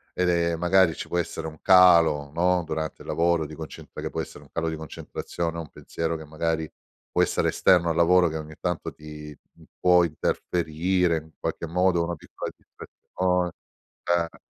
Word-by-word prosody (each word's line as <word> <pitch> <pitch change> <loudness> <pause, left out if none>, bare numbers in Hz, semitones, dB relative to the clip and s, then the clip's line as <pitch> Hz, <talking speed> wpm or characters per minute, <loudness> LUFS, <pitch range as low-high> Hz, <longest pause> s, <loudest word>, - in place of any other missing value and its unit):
ed 90 0 +1
è 85 -1 +2
magari 90 0 +3
ci - - -6
può 85 - -1
essere 80 -1 -4
un 80 -1 -8
calo, 85 -6 +6
no, 90 +1 +2
durante 80 0 -4
il - - -15
lavoro 85 -1 +1
di 75 - -9
concentra 80 0 -9
che - - -3
può - - -3
essere - - -9
un - - -21
calo 80 0 -1
di 80 - -3
concentrazione 80 +1 -5
o - - -2
un 80 - -10
pensiero 80 +3 -4
che 80 - -8
magari 80 +1 -2 0.4
può - - +2
essere - - +2
esterno 85 -2 +4
al 80 - -2
lavoro 90 +1 +5
che 80 -1 -3
ogni 80 0 -8
tanto 90 -2 -2
ti, 75 -1 -10 0.2
mhmm, - - -19
può 90 -1 +5
interferire 85 +2 0
in 80 0 -9
qualche 85 - -3
modo, 90 0 +2
una 85 +1 -3
piccola - - -7
distrazione. 90 -1 -3 0.5
Eh. 85 -1 0
85 Hz, 185 wpm, -25 LUFS, 80-90 Hz, 0.5 s, calo